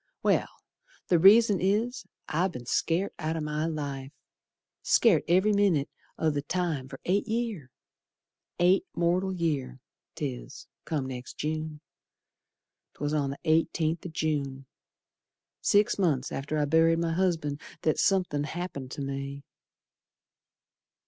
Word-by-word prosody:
Well, - - +2 0.6
the 175 - +4
reason 205 +2 +7
is 225 +6 0 0.2
I've 180 +4 0
be'n 120 -4 -7
scared 170 +9 0
out 160 0 -2
o' - - -2
my 150 +1 -2
life. 140 -4 -4 0.7
Scared 200 -10 +4
ev'ry 190 +5 +4
minit 195 -9 +2 0.3
o' 160 - +2
th' 145 -1 -3
time, 165 -8 -1
fer 135 - -9
eight 200 +4 +1
year. 220 - -2 0.9
Eight 180 +2 +4
mortal 180 +3 +1
year 145 -8 -2 0.4
'tis, 135 -1 -6 0.2
come 150 -5 -2
next 130 -1 -7
June. 155 0 -3 1.1
'Twas 145 +1 -2
on 145 -2 +1
the 140 - -6
eighteenth 160 0 +1
o' 180 - -5
June, 145 -4 -2 1.0
Six 205 0 +3
months 145 -8 +1
after 150 +3 -3
I'd 145 -1 0
buried 165 0 +5
my 165 0 0
husband, 165 -5 0 0.2
That 155 - +1
somethin' 180 -7 +2
happened 155 -5 -5
ter 140 - -5
me. 140 0 -5
160 Hz, 130 wpm, -28 LUFS, 140-180 Hz, 1.1 s, reason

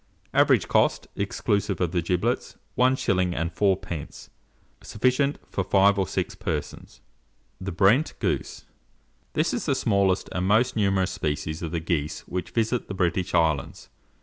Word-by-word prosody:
Average - - +4
cost, - - +2
exclusive 100 -1 -1
of 90 -3 0
the 90 -1 0
giblets, 90 +1 -1 0.2
1s. 90 -10 +1
4d. 95 -5 -2 0.5
Sufficient 130 +5 +1
for 100 - -2
5 100 +1 +4
or 95 - +1
6 - - -2
persons. - - -5 0.6
THE 95 +1 -4
BRENT 100 - +3
GOOSE. - - -3 0.7
This - - +1
is - - -3
the - - +2
smallest 95 -2 +1
and 90 +1 -1
most 110 +5 +3
numerous 95 -3 +1
species 75 +1 -3
of 85 - -3
the 85 +1 -2
geese 75 -2 -2
which 90 0 -5
visit 115 +1 -1
the 100 - -5
British 90 0 0
islands. 80 -5 0
95 Hz, 140 wpm, -25 LUFS, 85-100 Hz, 0.7 s, Average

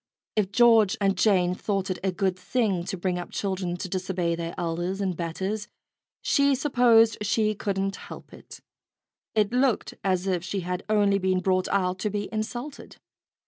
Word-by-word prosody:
If 205 -3 0
George 225 -3 +5
and 195 -1 +2
Jane 180 -2 +3
thought 195 0 -2
it 180 - -4
a 190 - +1
good 185 +1 0
thing 190 -2 -1
to 190 - -4
bring 180 0 -1
up 175 - -7
children 185 -3 -3
to 185 - -5
disobey 180 -2 -1
their 170 0 -4
elders 175 +3 -2
and 190 -3 -1
betters, 190 +6 -3 0.6
she 280 -1 +3
supposed 245 -5 +4
she 215 +1 +1
couldn't 195 -1 -2
help - - -11
it. - - -13 0.7
It 210 +1 +2
looked 250 -2 +1
as 185 -1 0
if 180 -3 -1
she 190 +1 -3
had 180 +1 -4
only 205 -2 +3
been 185 -1 +1
brought 185 0 +1
out 185 -1 0
to 210 - -1
be 205 0 -3
insulted. 240 +6 -5
195 Hz, 170 wpm, -26 LUFS, 180-215 Hz, 0.7 s, George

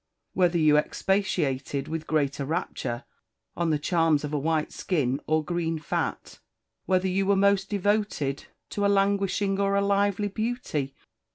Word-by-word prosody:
_ - - -56 0.3
whether 175 -2 +3
you 155 -2 +5
expatiated 150 -7 -1
with 160 0 -4
greater 145 -2 0
rapture 140 -5 -3 0.5
on 170 -1 0
the 155 - +2
charms 160 -1 +2
of 150 0 -4
a 150 - +1
white 155 +1 0
skin 140 -7 -1
or 155 0 +1
green 165 -1 -1
fat? 155 - -3 0.5
whether 185 0 +2
you 190 +1 +1
were 200 - +4
most 195 0 +3
devoted 205 -9 0 0.3
to 205 - -2
a 200 - +4
languishing 195 0 +1
or 200 0 +2
a 200 - +3
lively 200 0 +1
beauty? 205 - -3
175 Hz, 155 wpm, -26 LUFS, 150-200 Hz, 0.5 s, you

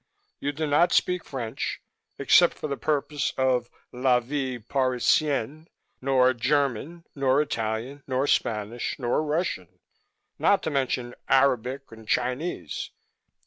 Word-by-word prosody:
You 145 - -1
do 155 +2 -3
not 150 +4 +3
speak 180 -1 +2
French 120 -5 -4 0.4
except - - +5
for - - -5
the 140 - -2
purpose 145 0 -1
of 125 -2 +1 0.2
'La 125 0 +3
Vie 130 0 -3
Parisienne' 135 +4 0 0.3
nor 130 -1 +4
German 140 +5 -1
nor 135 -1 +2
Italian 115 0 -2
nor 130 +1 0
Spanish 115 +1 -1
nor 125 0 0
Russian, 155 +4 -2 0.6
not 200 - +3
to 160 - -2
mention 130 -3 -1 0.2
Arabic 135 0 +2
and 110 -1 -13
Chinese. 125 - -2
135 Hz, 120 wpm, -26 LUFS, 125-145 Hz, 0.6 s, except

